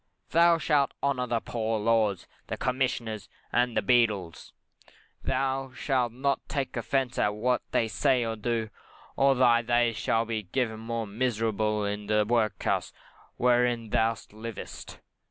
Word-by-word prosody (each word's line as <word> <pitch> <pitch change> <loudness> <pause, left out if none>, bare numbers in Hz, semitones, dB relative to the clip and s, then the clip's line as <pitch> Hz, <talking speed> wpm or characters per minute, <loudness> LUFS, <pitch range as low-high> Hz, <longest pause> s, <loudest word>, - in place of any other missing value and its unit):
Thou 170 +1 +5
shalt 150 -3 +1
honour 130 -3 0
the 115 -1 0
Poor 115 -1 -2
Laws, 110 -3 +1 0.2
the - - -4
Commissioners, 115 -6 -2 0.2
and 120 -1 +2
the - - +2
Beadles; 105 -9 +1 0.7
thou 135 0 -1
shalt 130 -4 0 0.4
take 135 -3 -2
no - - -1
offence 130 +1 -1
at 105 0 +1
what 125 +4 +1
they 115 - +1
say 125 +2 +2
or 115 0 -2
do, 110 0 -2 0.4
or 135 0 +4
else - - -5
thy 120 -2 +5
days 120 -1 +1
shall 115 +1 +1
be 110 -4 -4
made 120 -4 +1
more 115 0 -3
miserable 110 -1 0
in 105 0 -4
the 105 0 +2
workhouse 110 -1 0 0.5
wherein 120 -2 +2
thou 115 +1 +2 0.2
livest. 110 +1 -8
115 Hz, 145 wpm, -28 LUFS, 110-125 Hz, 0.7 s, Thou